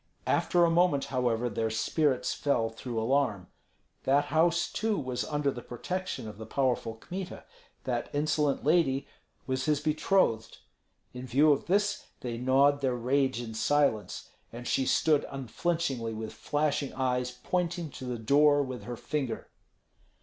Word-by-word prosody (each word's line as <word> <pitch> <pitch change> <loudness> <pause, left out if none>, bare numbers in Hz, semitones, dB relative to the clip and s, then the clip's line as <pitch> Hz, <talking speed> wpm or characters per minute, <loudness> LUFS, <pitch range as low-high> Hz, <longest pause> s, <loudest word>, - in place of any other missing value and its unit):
After 175 -1 +3
a 165 - +2
moment, 165 -5 +3
however, 125 -2 +1
their 115 0 -1
spirits 130 +5 +1
fell 120 -6 0
through 115 0 -4
alarm. 110 -6 0 0.6
That 140 +2 +3
house 170 +1 +3
too 220 -1 -1
was 125 -4 -2
under 145 -1 0
the 120 - -7
protection 180 +3 -4
of 105 0 -9
the 110 - -6
powerful 125 -4 0
Kmita; 180 +10 -7 0.4
that - - -2
insolent 145 -1 0
lady 150 -4 +2 0.4
was 130 0 -1
his 150 -2 +2
betrothed. 150 - +1 0.6
In 125 +1 -7
view 145 +5 +5
of 140 - 0
this 205 +3 +1
they 120 -2 -4
gnawed 140 +3 +3
their 130 -2 +1
rage 130 +1 +1
in 115 -2 -6
silence, 140 -2 0 0.2
and 120 +1 -8
she 130 - +1
stood 155 -3 +3
unflinchingly 135 -3 -2
with 110 0 -6
flashing 145 -2 -1
eyes 125 -1 0
pointing 170 +5 -2
to 130 - -8
the 125 -1 -3
door 145 +5 +4
with 130 -2 -6
her 120 -1 -5
finger. 140 -4 -3
135 Hz, 150 wpm, -29 LUFS, 120-150 Hz, 0.6 s, view